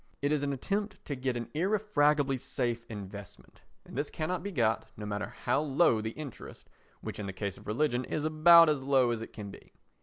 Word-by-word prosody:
It 145 - +2
is 150 -2 +1
an 145 -1 -1
attempt 200 +8 -3
to 145 - -3
get 130 -1 -2
an 120 - -5
irrefragably 150 -6 +2
safe 120 -2 -2
investment, 100 -2 -9 0.2
and - - -12
this 145 +3 -1
cannot 170 +2 -2
be 200 +3 -5
got, 110 - +1
no 105 - -6
matter 105 0 -3 0.2
how - - +2
low 145 -5 +3
the 110 - -3
interest, 140 +1 -10 0.3
which - - -6
in 100 - -4
the 95 - -5
case 100 0 -4
of - - -15
religion 125 +2 0
is 155 - -2
about 165 +2 +7
as 150 -3 +1
low 130 -2 +3
as 115 -1 -2
it 115 - -7
can 105 -2 -8
be. - - -15
135 Hz, 210 wpm, -30 LUFS, 110-155 Hz, 0.3 s, about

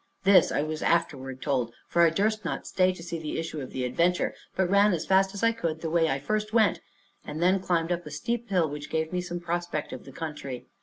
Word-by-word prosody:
This 190 -3 +6
I 145 - +1
was 155 0 -4
afterward 135 -6 0
told, 125 -5 -1
for 170 - +2
I 170 - +7
durst 210 +5 0
not - - -3
stay 185 0 +2
to 180 -2 -9
see 170 -1 -4
the 155 -1 -4
issue 160 -2 -4
of 130 - -6
the 130 - -3
adventure, 170 +8 +1 0.2
but 190 -1 +2
ran 200 +2 +4
as 165 - -2
fast 190 0 +3
as 200 - -5
I 230 - +5
could 165 -8 -3
the 160 - -3
way 165 -1 +3
I 135 - +1
first 215 +9 -2
went, 220 -5 +4 0.4
and 150 - -6
then 185 +3 +3
climbed 175 -2 0
up 175 -2 -2
a - - -5
steep 235 +11 -3
hill, 180 -5 +2
which 145 0 -7
gave 160 +1 -1
me 180 - 0
some 175 -1 -5
prospect 175 -2 -3
of - - -8
the 135 - -10
country. 145 -4 -6
170 Hz, 245 wpm, -27 LUFS, 150-190 Hz, 0.4 s, I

